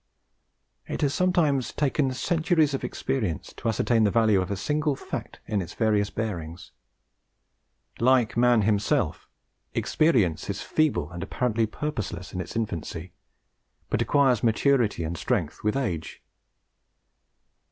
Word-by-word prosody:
It - - -4
has 140 -1 +2
sometimes 160 -8 +2
taken 140 -1 +1
centuries 160 -1 +2
of 135 - -2
experience 105 - -2
to - - -5
ascertain 115 0 +2
the 105 - +4
value 110 -3 +3
of 90 - -4
a 100 - -2
single 150 +6 0
fact - - -6
in 105 -2 -1
its 85 - -8
various 105 -2 +2
bearings. 90 -7 -5 1.3
Like 125 -2 +3
man 120 -2 +4
himself, 105 0 0 0.5
experience 115 - +2
is 100 +1 -3
feeble 150 - 0
and 85 0 -6
apparently 115 +3 0
purposeless 110 -8 -5
in 90 - -2
its 90 - -8
infancy, 90 -5 -4 0.8
but - - +1
acquires 135 -5 +3
maturity 115 -4 +2
and 80 +2 -3
strength - - -2
with 105 0 +1
age. 85 - -3
115 Hz, 130 wpm, -26 LUFS, 100-140 Hz, 1.3 s, the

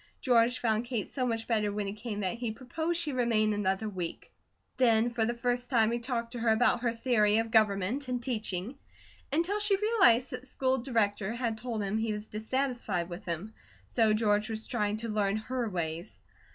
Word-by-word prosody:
George 245 -1 +3
found 225 0 0
Kate 235 -5 -2
so 255 -2 -1
much 225 -1 -2
better 215 -3 +1
when 205 0 -2
he 195 - -3
came 210 -1 -5
that 185 -2 0
he 240 -2 -2
proposed 315 +9 -2
she 310 -4 -2
remain 225 -4 +2
another 205 +1 0
week. 180 -5 -5 0.5
Then 235 -2 +4
for 235 -2 0
the 240 - -1
first 245 +1 -1
time 225 -4 +3
he 235 - -1
talked 235 -1 -3
to 245 - -6
her 230 0 +1
about 235 +2 +3
her 240 -1 +1
theory 230 -3 +2
of 225 0 0
government 215 +4 +2
and 250 -1 -1
teaching, 230 0 -4 0.5
until 340 +8 +1
she 410 -1 +4
realized 335 - +4
that 250 - -4
the 260 - -15
School 260 0 0
Director 220 -4 0
had 235 -2 -1
told 220 -1 -3
him 200 +2 -1
he 220 -1 0
was 210 0 -5
dissatisfied 220 -5 -2
with 175 +4 -8
him 180 +5 -4 0.3
so 225 -3 +2
George 215 0 +2
was 220 0 -3
trying 210 0 -1
to 230 +1 -4
learn 210 -2 0
her 240 +1 -3
ways. 170 0 -4
225 Hz, 200 wpm, -30 LUFS, 210-250 Hz, 0.5 s, Then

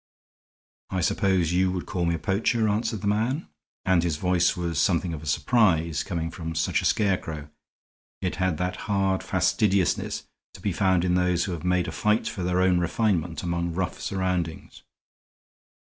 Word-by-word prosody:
"I 95 - -1
suppose 90 -1 +2
you 90 +1 +2
would 90 - -3
call 90 -5 -2
me 85 0 +1
a - - -2
poacher," 110 +7 +1
answered 110 +1 -1
the 100 - -2
man; 115 +9 0 0.4
and 95 -2 +4
his 85 -3 -1
voice 90 +1 +2
was 85 -3 -1
something 90 -1 +1
of 75 - -6
a 80 - -9
surprise 85 - +2
coming 80 -2 -3
from 80 -1 -6
such 80 0 +1
a - - -4
scarecrow; 80 -7 0 0.7
it - - -3
had 95 -3 0
that 90 +1 -2
hard 95 -2 +1
fastidiousness 95 0 +1 0.3
to - - -11
be - - -1
found 95 -2 +2
in 90 - +2
those 90 -1 +2
who 95 - -3
have 85 -2 -5
made 90 0 +1
a - - -3
fight 105 +1 +1
for 95 - -4
their 90 +1 +1
own 90 -1 +3
refinement 90 -3 0
among 85 -1 -1
rough 90 -1 -2
surroundings. 90 -4 -3
90 Hz, 175 wpm, -26 LUFS, 85-95 Hz, 0.7 s, and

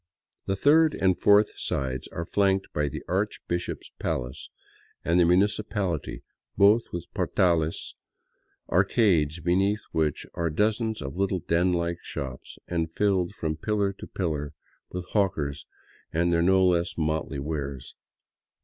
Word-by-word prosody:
The 95 - +1
third 155 +8 +4
and 95 -1 +2
fourth 105 +1 +5
sides 65 -2 -2
are 85 - -5
flanked 95 +1 +1
by 75 -1 0
the - - -7
archbishop's 85 0 -3
palace 60 +1 -3 0.6
and 85 +2 +3
the 85 - +6
municipaHty, 95 -2 0 0.3
both 105 +4 +6
with 85 -2 -5
portales, 85 -3 +1 0.7
arcades 90 - +2
beneath 95 +5 +2
which 80 -2 0
are 85 -1 -1
dozens 110 +3 0
of 70 +4 -6
little 95 -2 0
den 90 +2 +2
like 85 0 -1
shops, 65 -1 -7
and 80 -2 -1
filled 100 -2 +1
from 80 -4 -2
pillar 100 +2 0
to - - -8
pillar 75 -5 -3 0.3
with 90 -1 -5
hawkers 75 -9 -1 0.4
and 85 +2 +1
their 85 - +3
no 95 +2 +4
less 85 -2 +1
motley 80 -2 -1
wares. 70 -2 -4
85 Hz, 130 wpm, -26 LUFS, 80-100 Hz, 0.7 s, the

